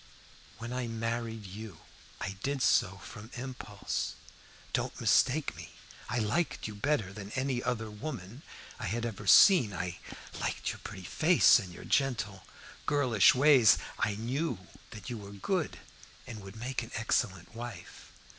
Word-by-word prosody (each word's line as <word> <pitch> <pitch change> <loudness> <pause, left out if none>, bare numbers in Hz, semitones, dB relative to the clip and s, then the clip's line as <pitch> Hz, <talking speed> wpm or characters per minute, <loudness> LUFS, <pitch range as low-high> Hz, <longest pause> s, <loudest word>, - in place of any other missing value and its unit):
When 120 +2 -6
I 125 -1 -2
married 115 -1 -3
you 100 -2 -9 0.4
I 100 - -4
did 140 +1 -1
so 95 - +3
from 105 +1 -10
impulse. 120 -5 -4 0.6
Don't - - -1
mistake 145 +3 +3
me. - - -10 0.4
I 120 - -1
liked 120 +8 0
you 105 - -6
better 105 -3 0
than 100 -1 -8
any 130 -2 0
other 115 -3 -2
woman 115 -1 -7 0.4
I - - -3
had 115 +5 -2
ever 105 -3 -5
seen. 120 - +7
I 90 0 -4 0.4
liked - - -2
your - - -9
pretty 95 - -8
face, 160 - +5
and 95 -5 -7
your 85 - -10
gentle, 105 -8 0 0.4
girlish 130 -9 +5
ways. 130 -5 +7 0.2
I 105 - +1
knew 125 - -2 0.3
that 110 +3 -8
you 120 - -4
were 100 -1 -10
good, 160 - -1 0.5
and 110 -3 -8
would 95 +1 -10
make 125 +3 -3
an 115 - -8
excellent 105 -4 -1
wife. 115 -5 -9
115 Hz, 150 wpm, -31 LUFS, 100-130 Hz, 0.6 s, seen